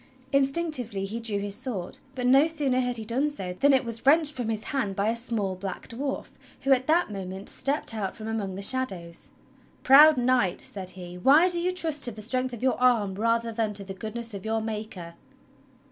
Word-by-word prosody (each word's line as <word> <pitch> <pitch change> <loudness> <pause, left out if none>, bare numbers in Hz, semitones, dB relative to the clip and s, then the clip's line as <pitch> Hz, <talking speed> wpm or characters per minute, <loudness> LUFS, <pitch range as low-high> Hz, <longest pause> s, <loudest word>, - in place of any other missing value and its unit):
Instinctively 275 -7 +1
he 220 +4 -4
drew 225 -3 -3
his 200 0 -3
sword; 210 -6 -4 0.2
but 250 -1 -3
no 270 +5 +5
sooner 285 -6 +1
had 245 -1 0
he 220 - -6
done 260 +7 0
so 190 -11 -5
than 280 +10 +3
it 265 -1 +3
was 230 -1 -3
wrenched 300 +2 +5
from 245 -4 -3
his 220 -1 -2
hand 255 -9 -2
by 200 +2 0
a 230 - 0
small 230 -5 -2
black 190 0 -7
dwarf 270 +3 -4 0.3
who 275 - 0
at 260 -1 +3
that 325 -6 +2
moment 190 0 -1
stepped 280 -3 -1
out 205 -4 -4
from 220 -1 -7
among 210 -4 -3
the 200 - -5
shadows. 190 -9 0 0.5
"Proud 295 +2 +8
Knight," 245 -7 +1
said 190 -2 -5
he," 180 0 -9
why 290 - +5
do 350 -1 +1
you 360 +1 0
trust 325 -5 -2
to 240 - +1
the 215 -1 -10
strength 255 +3 -1
of 240 0 -8
your 260 -1 0
arm 230 -6 +3
rather 230 +3 0
than 220 -2 -2
to 200 - -1
the 195 0 -7
goodness 225 +3 -7
of 195 - -7
your 220 0 -1
Maker.?" 215 -6 -6
230 Hz, 210 wpm, -26 LUFS, 200-270 Hz, 0.5 s, Proud